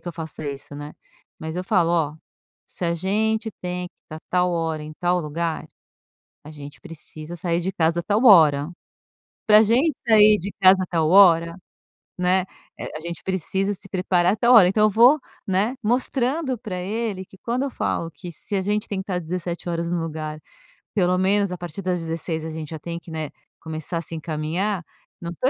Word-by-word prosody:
que -, -, -25 dB
eu 175 Hz, -, -5 dB
faço 160 Hz, -1 st, -7 dB
isso, 140 Hz, 0 st, -6 dB
né, 145 Hz, +1 st, -8 dB, 0.5 s
mas 160 Hz, +2 st, -6 dB
eu 180 Hz, -, -3 dB
falo: 180 Hz, -6 st, +2 dB
"Ó, 160 Hz, -3 st, +1 dB, 0.5 s
se 180 Hz, -, -7 dB
a 170 Hz, -, +1 dB
gente 220 Hz, +5 st, 0 dB
tem 180 Hz, 0 st, -4 dB
que 175 Hz, -, -64 dB
estar 155 Hz, -, -9 dB
tal 180 Hz, 0 st, +2 dB
hora 160 Hz, -2 st, -2 dB
em 155 Hz, +1 st, -8 dB
tal 175 Hz, +2 st, 0 dB
lugar, 160 Hz, +1 st, -3 dB, 0.8 s
a 150 Hz, -, -11 dB
gente 145 Hz, -1 st, -11 dB
precisa 155 Hz, +1 st, -9 dB
sair 170 Hz, 0 st, -1 dB
de 190 Hz, +3 st, -2 dB
casa 165 Hz, 0 st, +1 dB
tal 210 Hz, +6 st, +1 dB
hora. 155 Hz, -, +6 dB, 0.8 s
Pra 215 Hz, 0 st, +8 dB
gente 255 Hz, +8 st, +2 dB
sair 215 Hz, -1 st, +6 dB
de 200 Hz, +3 st, -6 dB
casa 185 Hz, 0 st, +6 dB
tal 160 Hz, -2 st, +1 dB
hora, 170 Hz, -3 st, +6 dB, 0.6 s
né, 180 Hz, +1 st, +2 dB, 0.3 s
eh, -, -, -5 dB
a -, -, -4 dB
gente 170 Hz, -1 st, -6 dB
precisa 190 Hz, +2 st, -1 dB
se 195 Hz, +1 st, -9 dB
preparar 180 Hz, 0 st, +2 dB
tal 240 Hz, +1 st, +4 dB
hora". 195 Hz, -6 st, +8 dB
Então 210 Hz, +3 st, +3 dB
eu -, -, +4 dB
vou, 240 Hz, +8 st, +6 dB, 0.3 s
né, 200 Hz, +6 st, +1 dB
mostrando 255 Hz, +4 st, 0 dB
pra 210 Hz, -5 st, -6 dB
ele 205 Hz, 0 st, -3 dB
que 190 Hz, -, -18 dB
quando 245 Hz, +6 st, -2 dB
eu 280 Hz, -, -2 dB
falo 165 Hz, -, -2 dB
que 175 Hz, +1 st, -9 dB
se 200 Hz, +6 st, -6 dB
a 195 Hz, -, +1 dB
gente 205 Hz, +2 st, -1 dB
tem 200 Hz, -, -3 dB
que -, -, -4 dB
estar 185 Hz, -2 st, -2 dB
17h 170 Hz, 0 st, -4 dB
no 175 Hz, -, 0 dB
lugar, 155 Hz, -1 st, -5 dB, 0.5 s
pelo 185 Hz, -3 st, +2 dB
menos 195 Hz, +1 st, +2 dB
a 180 Hz, -, -4 dB
partir 175 Hz, +2 st, -7 dB
das 180 Hz, -1 st, -1 dB
16 165 Hz, -1 st, -4 dB
a -, -, -4 dB
gente 155 Hz, -1 st, -6 dB
já 160 Hz, -, -6 dB
tem 170 Hz, +2 st, -6 dB
que, 170 Hz, -, -15 dB
né, 155 Hz, -2 st, -4 dB, 0.3 s
começar 160 Hz, +1 st, -5 dB
a 165 Hz, -, -2 dB
se 165 Hz, -, -5 dB
encaminhar, 165 Hz, +5 st, -2 dB, 0.4 s
não 170 Hz, -, -5 dB
estou 255 Hz, +10 st, 0 dB
180 Hz, 195 wpm, -23 LUFS, 165-200 Hz, 0.8 s, Pra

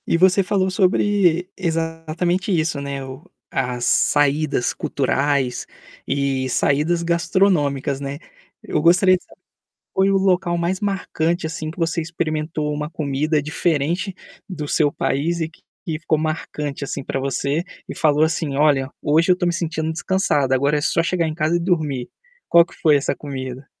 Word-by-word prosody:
E -, -, +2 dB
você 185 Hz, +2 st, +5 dB
falou 190 Hz, 0 st, 0 dB
sobre 185 Hz, -2 st, +2 dB
exatamente 165 Hz, +2 st, -1 dB
isso 155 Hz, -3 st, -1 dB
,né, 140 Hz, -1 st, -4 dB
o 130 Hz, +3 st, -9 dB, 0.3 s
as 125 Hz, -2 st, -1 dB
saídas 145 Hz, -1 st, +2 dB
culturais, 135 Hz, -2 st, 0 dB, 0.4 s
eh 135 Hz, -1 st, 0 dB
saídas 155 Hz, +7 st, +1 dB
gastronômicas, 170 Hz, -6 st, +1 dB
né, 140 Hz, 0 st, -5 dB, 0.5 s
eu 155 Hz, -, -1 dB
gostaria 185 Hz, +3 st, +5 dB
de -, -, -20 dB
saber -, -, -21 dB, 0.5 s
qual 190 Hz, -, +2 dB
foi 195 Hz, -, +3 dB
o 195 Hz, -, +3 dB
local 180 Hz, -2 st, +1 dB
mais 175 Hz, +2 st, -1 dB
marcante 175 Hz, -4 st, -1 dB
assim 160 Hz, -1 st, -4 dB
que 165 Hz, -, -12 dB
você 165 Hz, 0 st, 0 dB
experimentou 155 Hz, -2 st, -2 dB
uma 150 Hz, +1 st, -4 dB
comida 150 Hz, 0 st, 0 dB
diferente 160 Hz, +4 st, -1 dB, 0.3 s
do 165 Hz, -6 st, -5 dB
seu 145 Hz, 0 st, +2 dB
país 165 Hz, +5 st, -1 dB
e 160 Hz, -, -1 dB
que 165 Hz, -, -23 dB, 0.2 s
e 155 Hz, -2 st, -2 dB
ficou 155 Hz, -1 st, 0 dB
marcante 150 Hz, -2 st, -3 dB
assim 140 Hz, 0 st, -4 dB
para 135 Hz, -, -3 dB
você, 140 Hz, +4 st, -1 dB, 0.2 s
e -, -, -6 dB
falou 150 Hz, -1 st, +3 dB
assim: 160 Hz, -3 st, 0 dB
"Olha, 140 Hz, -2 st, +3 dB
hoje 160 Hz, +4 st, +2 dB
eu -, -, +9 dB
estou 180 Hz, 0 st, -2 dB
me 175 Hz, -, +1 dB
sentindo 160 Hz, -2 st, -2 dB
descansada, 160 Hz, -6 st, +1 dB
agora 140 Hz, +3 st, +2 dB
é 145 Hz, -, -1 dB
só 165 Hz, -, +2 dB
chegar 170 Hz, 0 st, 0 dB
em 155 Hz, -, -3 dB
casa 160 Hz, +1 st, +1 dB
e -, -, +2 dB
dormir". 155 Hz, -8 st, -1 dB, 0.4 s
Qual 170 Hz, -, +7 dB
que -, -, -17 dB
foi 150 Hz, -2 st, +4 dB
essa 140 Hz, -, 0 dB
comida? 130 Hz, -2 st, -6 dB
155 Hz, 165 wpm, -21 LUFS, 140-175 Hz, 0.5 s, eu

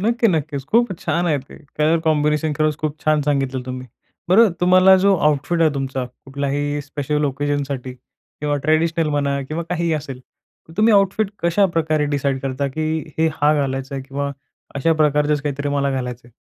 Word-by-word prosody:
नक्की, 230 Hz, +3 st, +2 dB
नक्कीचं. 150 Hz, -5 st, -1 dB
खूपचं 235 Hz, -3 st, +3 dB
छान 175 Hz, +1 st, 0 dB
आहे 150 Hz, -4 st, +2 dB
ते 135 Hz, -, -13 dB, 0.2 s
कलर 155 Hz, +2 st, +3 dB
कॉम्बिनेशन. 150 Hz, 0 st, +1 dB
खरचं 155 Hz, -1 st, +1 dB
खूप 155 Hz, 0 st, -3 dB
छान 155 Hz, -1 st, +3 dB
सांगितलं 135 Hz, -3 st, -1 dB
तुम्ही. 130 Hz, 0 st, -6 dB, 0.4 s
बरं 215 Hz, +4 st, +6 dB
तुम्हाला 185 Hz, +1 st, +6 dB
जो 195 Hz, +1 st, +4 dB
आउटफिट 150 Hz, +2 st, +1 dB
आहे 160 Hz, -1 st, +4 dB
तुमचा 135 Hz, -1 st, -2 dB, 0.2 s
कुठल्याही 145 Hz, +1 st, -2 dB
स्पेशल 145 Hz, +1 st, -2 dB
ओकेजनसाठी 140 Hz, -2 st, -2 dB
किंवा 145 Hz, +3 st, -6 dB
ट्रेडिशनल 160 Hz, +1 st, +2 dB
म्हणा 140 Hz, -1 st, 0 dB
किंवा 160 Hz, +2 st, -3 dB
काहीही 170 Hz, -1 st, 0 dB
असेल. 140 Hz, -4 st, -4 dB, 0.5 s
तर -, -, -13 dB
तुम्ही 215 Hz, +2 st, +4 dB
आउटफिट 200 Hz, +1 st, +2 dB
कशाप्रकारे 165 Hz, -4 st, +2 dB
डिसाईड 140 Hz, -2 st, -1 dB
करता 135 Hz, +1 st, -2 dB
की 155 Hz, 0 st, -1 dB, 0.3 s
हे 160 Hz, -, +3 dB
हा 145 Hz, +1 st, +5 dB
घालायचंय? 135 Hz, -1 st, -2 dB
किंवा 140 Hz, +1 st, -3 dB, 0.4 s
अशा 150 Hz, +4 st, +2 dB
प्रकारचचं 150 Hz, -1 st, +2 dB
काहीतरी 145 Hz, -1 st, -2 dB
मला 140 Hz, -1 st, 0 dB
घालायचंय? 125 Hz, -2 st, -5 dB
150 Hz, 160 wpm, -20 LUFS, 140-165 Hz, 0.5 s, बरं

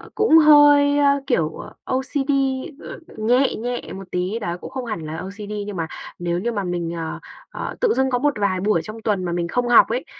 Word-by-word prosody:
cũng 430 Hz, -7 st, +5 dB
hơi, 290 Hz, -2 st, +6 dB
ơ, 280 Hz, -1 st, +3 dB
kiểu, 160 Hz, -9 st, +1 dB
ờ, -, -, -10 dB
OCD, 270 Hz, +2 st, -2 dB, 0.5 s
ờ, -, -, -9 dB, 0.2 s
nhẹ 245 Hz, +5 st, +2 dB
nhẹ 245 Hz, +2 st, -3 dB
một 190 Hz, -1 st, -10 dB
tí 185 Hz, +5 st, -2 dB
đó, 175 Hz, -5 st, -4 dB
cũng -, -, -8 dB
không 260 Hz, -2 st, -5 dB
hẳn 215 Hz, -7 st, -4 dB
là 155 Hz, +1 st, -5 dB
OCD 200 Hz, +4 st, -7 dB
nhưng 205 Hz, -, -5 dB
mà 165 Hz, -1 st, -2 dB, 0.3 s
nếu 175 Hz, 0 st, -1 dB
như 235 Hz, +6 st, -2 dB
mà 205 Hz, -3 st, -2 dB
mình, 175 Hz, -2 st, -3 dB
ờ, 165 Hz, -1 st, -5 dB, 0.3 s
ờ, -, -, -6 dB
tự 475 Hz, -3 st, +3 dB
dưng 265 Hz, 0 st, +1 dB
có 245 Hz, -, 0 dB
một 290 Hz, +2 st, +1 dB
vài 190 Hz, -2 st, 0 dB
buổi 205 Hz, -4 st, +1 dB
trong 220 Hz, +4 st, -9 dB
tuần 205 Hz, -4 st, -1 dB
mà 175 Hz, -, -2 dB
mình 170 Hz, 0 st, -1 dB
không 245 Hz, +6 st, -1 dB
học 240 Hz, -, +7 dB
ấy, -, -, -2 dB
220 Hz, 225 wpm, -21 LUFS, 180-270 Hz, 0.5 s, học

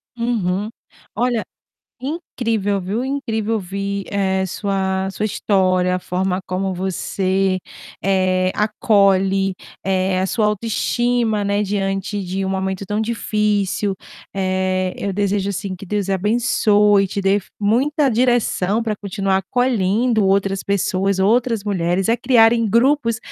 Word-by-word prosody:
Uhum. 215 Hz, -4 st, -1 dB, 0.5 s
Olha, 240 Hz, -1 st, 0 dB, 0.6 s
incrível 230 Hz, -, -2 dB
viu, 205 Hz, +7 st, -2 dB
incrível 225 Hz, -5 st, -2 dB
ouvir, 200 Hz, 0 st, -3 dB
eh, 190 Hz, -1 st, +1 dB
sua 190 Hz, 0 st, -1 dB
sua 210 Hz, -, -3 dB
história, 185 Hz, -3 st, +1 dB
a -, -, 0 dB
forma 185 Hz, +1 st, -1 dB
como 185 Hz, +1 st, -2 dB
você, 190 Hz, +1 st, 0 dB, 0.4 s
eh, 185 Hz, -1 st, +2 dB
acolhe, 195 Hz, -2 st, +2 dB, 0.3 s
eh, 190 Hz, -1 st, +1 dB
a 190 Hz, -, +1 dB
sua 215 Hz, +1 st, +1 dB
autoestima, 225 Hz, +1 st, 0 dB
né, 200 Hz, +1 st, +1 dB
diante 195 Hz, 0 st, -2 dB
de 190 Hz, +1 st, -3 dB
um -, -, -2 dB
momento 190 Hz, 0 st, -2 dB
tão 210 Hz, +2 st, -2 dB
difícil, 210 Hz, -3 st, 0 dB, 0.4 s
eh, 185 Hz, -1 st, 0 dB
eu 200 Hz, -, -2 dB
desejo, 200 Hz, 0 st, 0 dB
assim, 195 Hz, -1 st, -4 dB
que 195 Hz, -, -10 dB
Deus 200 Hz, 0 st, -2 dB
abençoe 210 Hz, 0 st, +3 dB
e -, -, -1 dB
te 200 Hz, -, -3 dB
dê 195 Hz, +1 st, +3 dB, 0.2 s
muita 270 Hz, +8 st, +2 dB
direção 235 Hz, -4 st, +1 dB
pra 220 Hz, -2 st, -2 dB
continuar 195 Hz, -1 st, -1 dB
acolhendo 225 Hz, 0 st, +1 dB
outras 195 Hz, 0 st, +1 dB
pessoas, 195 Hz, 0 st, 0 dB
outras 230 Hz, +2 st, +2 dB
mulheres 185 Hz, -2 st, 0 dB
a 230 Hz, -, +3 dB
criarem 230 Hz, -2 st, +4 dB
grupos, 235 Hz, +1 st, +2 dB
200 Hz, 125 wpm, -20 LUFS, 190-220 Hz, 0.6 s, criarem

